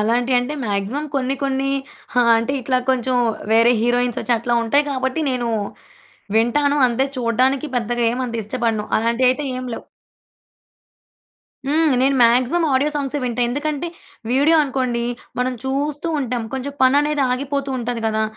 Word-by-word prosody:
అలాంటియంటే 245 Hz, +5 st, +1 dB
maximum 205 Hz, +7 st, -2 dB
కొన్ని 270 Hz, 0 st, 0 dB
కొన్ని 270 Hz, 0 st, 0 dB, 0.5 s
ఆ! -, -, +7 dB, 0.2 s
అంటే 230 Hz, +4 st, -2 dB
ఇట్లా 255 Hz, +1 st, +1 dB
కొంచెం 255 Hz, 0 st, 0 dB, 0.4 s
వేరే 230 Hz, +1 st, +5 dB
హీరోయిన్స్ 245 Hz, 0 st, +1 dB
ఒచ్చి 240 Hz, -, 0 dB
అట్లా 240 Hz, +1 st, -1 dB
ఉంటాయి 285 Hz, +6 st, +2 dB
కాబట్టి 260 Hz, +2 st, -1 dB
నేను 245 Hz, -2 st, -1 dB, 0.9 s
వింటాను. 280 Hz, +6 st, +2 dB
అంతే 245 Hz, +3 st, 0 dB
చూడ్డానికి 255 Hz, +4 st, +1 dB
పెద్దగా 240 Hz, 0 st, -1 dB
ఏమంత 245 Hz, -1 st, -3 dB
ఇష్టపడను. 225 Hz, -1 st, -1 dB
అలాంటియైతే 250 Hz, +5 st, +1 dB
ఏం 255 Hz, -, -5 dB
లేవు. -, -, -8 dB, 1.8 s
హ్మ్. 315 Hz, +3 st, +2 dB
నేను 270 Hz, +2 st, +3 dB
మాక్సిమం 250 Hz, +8 st, +3 dB
ఆడియో 285 Hz, +3 st, +2 dB
సాంగ్సే 285 Hz, 0 st, -2 dB
వింటా. 245 Hz, 0 st, -2 dB
ఎందుకంటే 295 Hz, +4 st, -2 dB, 0.4 s
వీడియో 285 Hz, +6 st, +4 dB
అనుకోండి 255 Hz, -4 st, -1 dB, 0.4 s
మనం 250 Hz, +1 st, 0 dB
చూస్తూ 290 Hz, +4 st, -2 dB
ఉంటాం. 245 Hz, -3 st, -2 dB
కొంచెం 265 Hz, +2 st, -4 dB
పననేది 285 Hz, +2 st, +3 dB
ఆగిపోతూ 280 Hz, +1 st, -2 dB
ఉంటది 240 Hz, -1 st, -3 dB
గదా! 220 Hz, 0 st, 0 dB
255 Hz, 135 wpm, -20 LUFS, 240-275 Hz, 1.8 s, ఆ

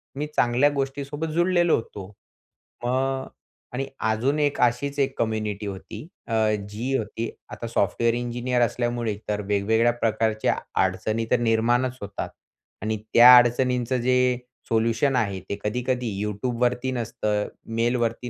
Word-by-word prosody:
मी 150 Hz, +2 st, -3 dB
चांगल्या 125 Hz, +4 st, +3 dB
गोष्टी 135 Hz, +1 st, -2 dB
सोबत 145 Hz, +3 st, -4 dB
जुळलेलो 175 Hz, 0 st, +3 dB
होतो. 100 Hz, -4 st, -6 dB, 0.8 s
मग 130 Hz, +2 st, 0 dB, 0.5 s
आणि 135 Hz, +2 st, -2 dB
अजून 120 Hz, +7 st, 0 dB
एक 145 Hz, -1 st, +1 dB
अशीच 140 Hz, +4 st, +1 dB
एक 135 Hz, -1 st, 0 dB
कम्युनिटी 110 Hz, -2 st, -2 dB
होती, 100 Hz, -, -8 dB, 0.2 s
अ, 115 Hz, -, -4 dB, 0.4 s
जी 120 Hz, +6 st, -2 dB
होती 110 Hz, +1 st, -4 dB, 0.2 s
आता 115 Hz, -, -6 dB
सॉफ्टवेअर 115 Hz, +1 st, +1 dB
इंजिनिअर 120 Hz, +1 st, -1 dB
असल्यामुळे 120 Hz, -2 st, 0 dB
तर 105 Hz, 0 st, 0 dB
वेगवेगळ्या 110 Hz, +4 st, +2 dB
प्रकारच्या 110 Hz, -2 st, 0 dB, 0.3 s
अडचणी 110 Hz, +5 st, -1 dB
तर 125 Hz, -, +4 dB
निर्माणच 120 Hz, +2 st, +1 dB
होतात 100 Hz, -, -5 dB, 0.5 s
आणि 110 Hz, 0 st, -1 dB, 0.2 s
त्या 125 Hz, +1 st, +10 dB
अडचणींचं 125 Hz, +1 st, +2 dB
जे 125 Hz, 0 st, +2 dB, 0.3 s
सोल्युशन 115 Hz, +4 st, +2 dB
आहे, 100 Hz, -6 st, 0 dB
ते 100 Hz, +2 st, -6 dB
कधी-कधी 125 Hz, +3 st, -1 dB, 0.2 s
YouTubeवरती 120 Hz, +4 st, -1 dB
नसतं, 110 Hz, -3 st, -2 dB, 0.3 s
मेलवरती 120 Hz, +1 st, 0 dB
120 Hz, 130 wpm, -24 LUFS, 110-130 Hz, 0.8 s, त्या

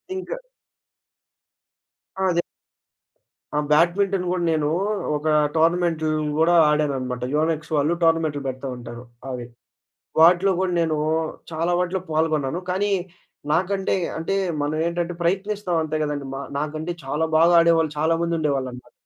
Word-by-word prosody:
ఇంకా 380 Hz, +6 st, -5 dB, 1.8 s
అదే. 180 Hz, -3 st, +2 dB, 1.1 s
ఆ! -, -, +2 dB
బ్యాడ్మింటన్ 180 Hz, +4 st, +3 dB
కూడా 180 Hz, -1 st, -1 dB
నేను, 155 Hz, -2 st, +1 dB, 0.5 s
ఒక 150 Hz, +1 st, -5 dB, 0.3 s
టోర్నమెంట్లు 165 Hz, -1 st, +2 dB, 0.3 s
కూడా 165 Hz, +2 st, +4 dB
ఆడాననమాట. 135 Hz, -5 st, 0 dB
యోనెక్స్ 155 Hz, 0 st, 0 dB
వాళ్ళు 150 Hz, +3 st, +2 dB
టోర్నమెంట్లు‌ 165 Hz, -3 st, +2 dB
పెడతా 130 Hz, +1 st, -4 dB
ఉంటారు. 120 Hz, -1 st, -9 dB, 0.3 s
అవి. 125 Hz, -2 st, -5 dB, 0.8 s
వాటిలో 175 Hz, +4 st, +6 dB
కూడా 185 Hz, -1 st, 0 dB
నేను 160 Hz, -2 st, +1 dB, 0.6 s
చాలా 165 Hz, +2 st, 0 dB
వాటిలో 180 Hz, +1 st, -1 dB
పాల్గొన్నాను. 155 Hz, 0 st, 0 dB
కానీ 200 Hz, +3 st, 0 dB, 0.6 s
నాకంటే, 190 Hz, +4 st, +1 dB, 0.2 s
అంటే 165 Hz, +4 st, -1 dB, 0.3 s
మనం 145 Hz, +1 st, -1 dB
ఏంటంటే 170 Hz, 0 st, -2 dB
ప్రయత్నిస్తాం 195 Hz, +1 st, -1 dB
అంతే 155 Hz, 0 st, -2 dB
కదండీ 145 Hz, -2 st, -3 dB
మా 135 Hz, -, -4 dB, 0.2 s
నాకంటే 155 Hz, +3 st, -3 dB
చాలా 150 Hz, +4 st, -1 dB
బాగా 165 Hz, +2 st, +5 dB
ఆడేవాళ్ళు 165 Hz, -2 st, +3 dB
చాలాామంది 165 Hz, +2 st, +1 dB
ఉండేవాళ్ళనటమాట. 130 Hz, -5 st, -2 dB
160 Hz, 115 wpm, -23 LUFS, 150-175 Hz, 1.8 s, వాటిలో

